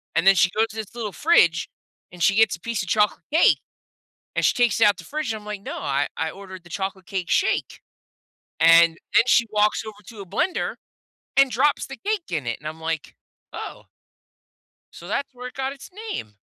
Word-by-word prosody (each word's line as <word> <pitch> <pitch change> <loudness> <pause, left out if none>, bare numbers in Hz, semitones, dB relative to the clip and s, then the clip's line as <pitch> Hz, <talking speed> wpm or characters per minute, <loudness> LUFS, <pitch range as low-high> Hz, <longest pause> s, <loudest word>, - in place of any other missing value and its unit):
And 180 - +2
then 195 - +8
she 185 +1 +4
goes 220 +1 +3
to - - -12
this 220 0 -6
little 220 -4 -4
fridge, 180 - +3 0.4
and 175 -1 -12
she 200 - +4
gets 220 -2 +4
a - - -33
piece 230 0 -3
of 185 - -8
chocolate 210 -1 +2
cake. 325 - +5 0.8
And - - +1
she - - +5
takes 245 -3 +2
it - - +7
out 205 - +3
the - - -10
fridge, 300 -5 -3
and 220 - -6
I'm 210 - -16
like, 210 -2 -6
"No, - - -6
I 140 +1 -1
I 160 0 -1
ordered 190 0 -11
the 175 - -16
chocolate 190 +1 -4
cake 190 -5 -4
shake. - - 0 0.8
And 165 0 +6 0.2
then - - +6
she 235 -2 +4
walks 210 +1 +2
over 215 -1 -9
to 225 -3 -10
a 195 - -8
blender 350 - -1 0.6
and 275 -1 +5
drops 275 +5 +2
the 270 - -8
cake 415 -3 -2
in 155 -7 -2
it, 115 - -2
and 150 - -6
I'm, 160 +1 -8
like, 160 -1 -4 0.4
"Oh" - - -8 1.1
so 170 - -11
that's 265 +7 -3
where 250 0 -7
it - - -14
got 270 0 -2
its 275 - -12 0.2
name. 105 - -5
210 Hz, 215 wpm, -23 LUFS, 170-245 Hz, 1.1 s, then